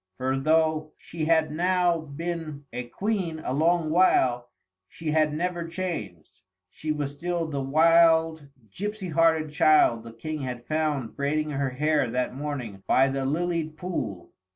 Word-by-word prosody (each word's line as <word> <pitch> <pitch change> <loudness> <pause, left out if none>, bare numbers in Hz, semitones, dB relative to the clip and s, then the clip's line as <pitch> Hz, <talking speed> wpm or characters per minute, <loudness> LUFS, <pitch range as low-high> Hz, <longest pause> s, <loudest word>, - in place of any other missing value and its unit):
For, 130 +1 -1
though 155 +2 +1
she 160 -2 -5
had 160 -1 +2
now 175 +1 +2
been 160 -1 -6
a 125 0 -4
Queen 185 - -2
a 125 - -1
long 160 +2 +2
while, 125 -9 +3 0.4
she 160 - -5
had 155 -1 +2
never 170 +2 -2
changed. 105 - -6 0.3
She 155 - -4
was 145 -2 -2
still 170 +2 -2
the 145 -3 -3
wild 160 +1 +4 0.2
gipsy 205 - -5
hearted 160 -1 +2
child 150 -7 +4
the 115 - -9
King 150 +7 -5
had 125 -2 -5
found 150 -6 -1
braiding 150 +2 -1
her 140 -1 -1
hair 145 0 +1
that 125 +2 -1
morning 130 -8 -5
by 135 +1 +4
the 135 0 -2
lilied 160 0 -1
pool. 125 - -5
155 Hz, 150 wpm, -26 LUFS, 135-165 Hz, 0.4 s, wild